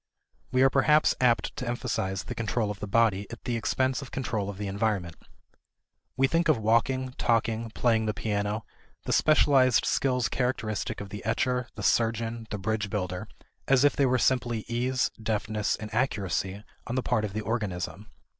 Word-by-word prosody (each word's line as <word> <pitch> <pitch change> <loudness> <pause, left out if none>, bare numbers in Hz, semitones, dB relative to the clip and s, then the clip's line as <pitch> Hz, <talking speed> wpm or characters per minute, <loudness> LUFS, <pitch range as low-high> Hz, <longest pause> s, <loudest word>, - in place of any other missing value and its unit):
We 130 +1 +4
are 135 - +6
perhaps 150 +3 +4
apt 120 -5 +2
to 125 - -4
emphasize 105 -6 -2
the - - -5
control 110 -1 -1
of 100 - -8
the 105 - -5
body 100 -2 +2
at 115 - -10
the 120 - -2
expense 130 +4 0
of 135 - -8
control 110 -6 -2
of 100 - -6
the 105 - -4
environment. 100 -4 -1 1.0
We 135 - +4
think 165 +4 +1
of 155 - +5
walking, 120 +4 +1
talking, 115 0 +1
playing 110 -2 +2
the 105 - 0
piano, 105 +1 -2 0.4
the - - -1
specialized 135 -5 +4
skills 125 -4 +1
characteristic 110 -6 -2
of 100 - -7
the 105 +1 -7
etcher, 125 +3 0
the - - -6
surgeon, 115 0 0
the 105 - -3
bridge 105 +1 -2
builder, 90 -3 -3 0.4
as 135 0 +4
if 145 - +4
they 140 - +3
were 130 0 +3
simply 120 -3 +1
ease, 125 +2 0
deftness, 105 -1 -1
and 110 0 -8
accuracy 100 -5 -1 0.2
on 120 - -3
the 130 - 0
part 110 - +1
of 105 -2 -3
the 110 - -2
organism. 105 -2 -3
115 Hz, 175 wpm, -28 LUFS, 105-125 Hz, 1.0 s, are